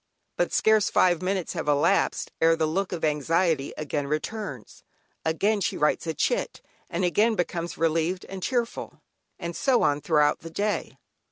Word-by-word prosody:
But -, -, 0 dB
scarce 220 Hz, -2 st, +3 dB
five 175 Hz, -2 st, +3 dB
minutes 185 Hz, -1 st, -1 dB
have 165 Hz, -4 st, -4 dB
elapsed, 150 Hz, +7 st, +2 dB
ere 165 Hz, 0 st, +5 dB
the 160 Hz, -1 st, +1 dB
look 185 Hz, +5 st, -1 dB
of 170 Hz, -3 st, -2 dB
anxiety 155 Hz, 0 st, +1 dB
again 145 Hz, -1 st, -3 dB
returns; 155 Hz, -, -5 dB, 0.4 s
again 200 Hz, +6 st, +1 dB
she -, -, -1 dB
writes 150 Hz, +2 st, +1 dB
a 160 Hz, -, -1 dB
"chit," -, -, -1 dB, 0.3 s
and 175 Hz, +2 st, -1 dB
again 215 Hz, +6 st, +3 dB
becomes 175 Hz, -2 st, -3 dB
relieved 165 Hz, +3 st, 0 dB
and 190 Hz, -1 st, -8 dB
cheerful, 240 Hz, +3 st, -3 dB, 0.3 s
and 170 Hz, -2 st, -5 dB
so 265 Hz, -3 st, +2 dB
on 145 Hz, 0 st, +2 dB
throughout 150 Hz, -2 st, +2 dB
the 165 Hz, -, -9 dB
day. 200 Hz, -6 st, -2 dB
170 Hz, 160 wpm, -26 LUFS, 155-195 Hz, 0.4 s, ere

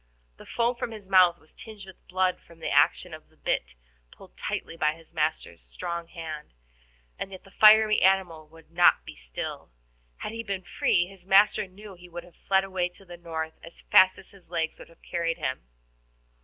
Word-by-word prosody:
The -, -, -14 dB
foam 240 Hz, +1 st, 0 dB
from 235 Hz, -, -3 dB
his 215 Hz, -4 st, -10 dB
mouth 185 Hz, -3 st, +5 dB
was 155 Hz, -, -23 dB
tinged 215 Hz, -3 st, -11 dB
with 190 Hz, -1 st, -16 dB
blood 185 Hz, 0 st, 0 dB
from 170 Hz, -, -18 dB
the 160 Hz, -, -4 dB
action -, -, +3 dB
of -, -, -11 dB
the -, -, -29 dB
bit, -, -, -2 dB, 0.3 s
pulled -, -, -17 dB
tightly -, -, -4 dB
by 155 Hz, -2 st, +1 dB
his 165 Hz, 0 st, -18 dB
master's 150 Hz, -, -2 dB
strong 170 Hz, -, -5 dB
hand, 160 Hz, -, -8 dB, 0.6 s
and 195 Hz, -, -5 dB
yet 190 Hz, -, -10 dB
the 195 Hz, -, -18 dB
fiery 215 Hz, +1 st, +6 dB
animal 180 Hz, -5 st, +2 dB
would 165 Hz, 0 st, -19 dB
not 175 Hz, +1 st, +4 dB
be -, -, -10 dB
still. -, -, -6 dB, 0.5 s
Had -, -, -5 dB
he 230 Hz, 0 st, -5 dB
been 200 Hz, -4 st, -4 dB
free, 175 Hz, 0 st, +1 dB
his 185 Hz, -1 st, -16 dB
master 200 Hz, +1 st, +5 dB
knew 200 Hz, +2 st, -12 dB
he 180 Hz, 0 st, -15 dB
would 175 Hz, 0 st, -7 dB
have 175 Hz, -1 st, -18 dB
fled 190 Hz, 0 st, +1 dB
away 185 Hz, -2 st, -1 dB
to 185 Hz, +2 st, -16 dB
the 175 Hz, -1 st, -10 dB
north 160 Hz, -2 st, -6 dB
as 165 Hz, -, -13 dB
fast 185 Hz, 0 st, +7 dB
as -, -, -14 dB
his 195 Hz, -4 st, -19 dB
legs 165 Hz, -2 st, -2 dB
would -, -, -12 dB
have 165 Hz, -, -22 dB
carried 170 Hz, -1 st, -2 dB
him. 130 Hz, -, -4 dB
175 Hz, 200 wpm, -27 LUFS, 165-195 Hz, 0.6 s, fast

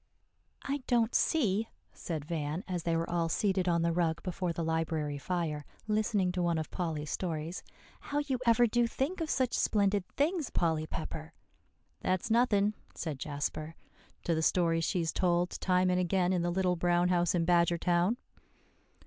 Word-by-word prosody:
"I 280 Hz, +1 st, -1 dB
don't 235 Hz, -2 st, +2 dB
see," 225 Hz, -, +2 dB, 0.2 s
said 155 Hz, -4 st, -5 dB
Van 155 Hz, +2 st, -3 dB
as 180 Hz, -2 st, -2 dB
they 165 Hz, 0 st, 0 dB
were 165 Hz, -, -1 dB
all 170 Hz, -1 st, 0 dB
seated 190 Hz, +1 st, +1 dB
on 170 Hz, -1 st, +2 dB
the 170 Hz, -, +2 dB
rug 165 Hz, -2 st, 0 dB
before 180 Hz, -1 st, -2 dB
the 165 Hz, 0 st, -3 dB
library 160 Hz, -3 st, -1 dB
fire, 160 Hz, -3 st, -2 dB, 0.2 s
listening 210 Hz, -3 st, +1 dB
to 180 Hz, 0 st, -2 dB
one 170 Hz, -1 st, +1 dB
of 155 Hz, -, -4 dB
Polly's 155 Hz, -4 st, -3 dB
stories, 165 Hz, -1 st, -3 dB, 0.4 s
"how 285 Hz, -, -4 dB
you 285 Hz, -4 st, 0 dB
ever 235 Hz, +1 st, +6 dB
do 240 Hz, +1 st, +2 dB
think 285 Hz, +10 st, -2 dB
of 320 Hz, -, -2 dB
such 260 Hz, -3 st, +1 dB
splendid 200 Hz, -2 st, +2 dB
things, 310 Hz, 0 st, +1 dB
Polly 160 Hz, -2 st, 0 dB
Pepper." 155 Hz, 0 st, -6 dB, 0.7 s
"That's 185 Hz, +4 st, -1 dB
nothing," 215 Hz, -3 st, +3 dB, 0.2 s
said 150 Hz, -5 st, -4 dB
Jasper, 155 Hz, +2 st, -4 dB, 0.5 s
"to 170 Hz, -, +1 dB
the 160 Hz, -, 0 dB
stories 165 Hz, -1 st, +2 dB
she -, -, 0 dB
has 165 Hz, -2 st, 0 dB
told 175 Hz, -1 st, +1 dB
time 185 Hz, 0 st, +3 dB
and 180 Hz, -, +2 dB
again 180 Hz, 0 st, +1 dB
in 180 Hz, -, +1 dB
The 175 Hz, -, 0 dB
Little 180 Hz, 0 st, +1 dB
Brown 175 Hz, +1 st, +2 dB
House 175 Hz, -1 st, +2 dB
in 170 Hz, -1 st, +1 dB
Badgertown." 175 Hz, +4 st, +2 dB
175 Hz, 170 wpm, -31 LUFS, 165-200 Hz, 0.7 s, ever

